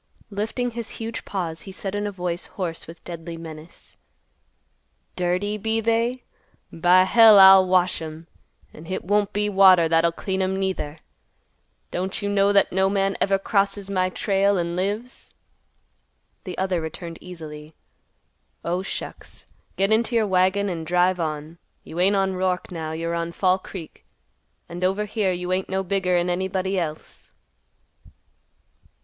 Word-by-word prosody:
Lifting 220 +5 -2
his 235 -1 -6
huge 225 0 -5
paws, 170 -5 -4
he 195 - -10
said 195 0 -5
in 205 0 -2
a - - -3
voice 180 -2 -4
hoarse 170 -4 -5
with 165 +1 -12
deadly 170 -1 -7
menace, 160 0 -11 1.2
"Dirty, 185 +4 -1
be 225 +2 0
they? 230 +3 0 0.5
By 175 +3 +5
hell, 220 +2 +7
I'll 190 -1 +9
wash 180 -2 +2
'em. 160 +1 -8 0.5
An' 155 - -12
hit 185 - -4
won't 205 +2 +1
be 210 0 0
water 190 -4 +6
that'll 165 +1 +3
clean 190 +3 -3
'em, 190 0 0
neither. 175 -5 -3 0.9
Don't 185 +2 -2
you 205 - -2
know 200 0 +3
that 200 -1 +3
no 190 +1 +2
man 195 0 0
ever 195 0 +3
crosses 200 0 0
my 185 -1 +1
trail 195 +1 +1
an' 170 -1 -2
lives?" 205 +7 -4 1.1
The 185 - -6
other 185 -2 0
returned 165 +1 -7
easily, 155 -4 -9 0.9
"Oh, 175 +2 -1
shucks! 195 - -7 0.3
Get 195 +2 +1
into 230 +2 +2
your 225 -2 +3
wagon 190 +1 +2
and 170 -4 -3
drive 180 +2 +2
on. 155 0 -4 0.2
You 165 - -7
ain't 195 +3 +4
on 195 -1 +1
Roark 185 -1 -1
now. 160 -3 -4
You're 165 +1 -3
on 170 0 -3
Fall 185 +1 +2
Creek, 185 -3 -10 0.6
and 175 +1 -7
over 195 +3 +1
here 210 -2 0
you 180 0 -2
ain't 185 0 -2
no 190 0 -1
bigger'n 180 -2 0
anybody 190 +1 -1
else." 155 -2 -6
185 Hz, 150 wpm, -23 LUFS, 170-200 Hz, 1.2 s, I'll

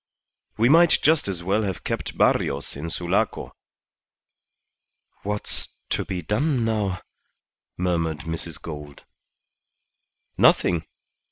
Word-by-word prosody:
We 115 +2 +4
might 165 +4 +6
just 155 -5 +4
as 90 -3 -3
well 100 +4 +1
have 95 -4 -3
kept - - -3
Barrios 70 +1 +1
in 75 +4 -5
Sulaco." 85 +1 -1 1.7
"What's 105 +1 -2 0.2
to - - 0
be 90 -2 -4
done 125 - +1
now?" 100 -5 -1 0.7
murmured 85 -4 0
Mrs. 80 -1 -5
Gould. 75 -3 -9 1.3
"Nothing. 85 -3 +4
90 Hz, 100 wpm, -24 LUFS, 80-110 Hz, 1.7 s, might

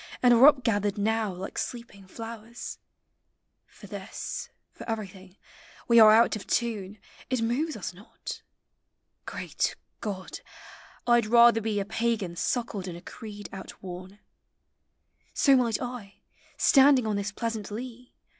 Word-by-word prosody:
And 245 -1 +7
are 240 +4 +8
up 275 -4 +5
gathered 205 -3 0
now 220 0 0
like 185 +1 -6
sleeping 230 -6 -6
flowers; 225 +2 -8 0.9
For - - -15
this, - - -6 0.2
for - - -10
everything, 195 -3 -6 0.5
we 235 -1 +6
are 215 -1 +9
out 230 +2 +6
<>!' 215 - -4
tune; 215 -4 -1 0.3
It 255 -3 0
moves 275 +6 -1
us 185 -2 -5
not. 200 +7 -9 0.4
— - - -52
Greal - - -6 0.5
<Jod! 195 -4 -5 0.7
I 240 0 +5
M 215 -2 -3
rather 235 -1 +6
be 215 -1 -1
A 195 - -2
Pagan 220 -4 -1
suckled 210 -1 -2
in 175 - -5
a 170 - -10
creed 205 0 -9
outworn, 190 0 -9 1.2
So 275 -2 +5
might 235 -4 +2
I, 245 -5 -6 0.4
standing 270 -3 +6
on 215 -1 0
this 200 +1 -2
pleasant 225 -1 -4
lea. 245 +3 -8
220 Hz, 140 wpm, -27 LUFS, 200-235 Hz, 1.2 s, are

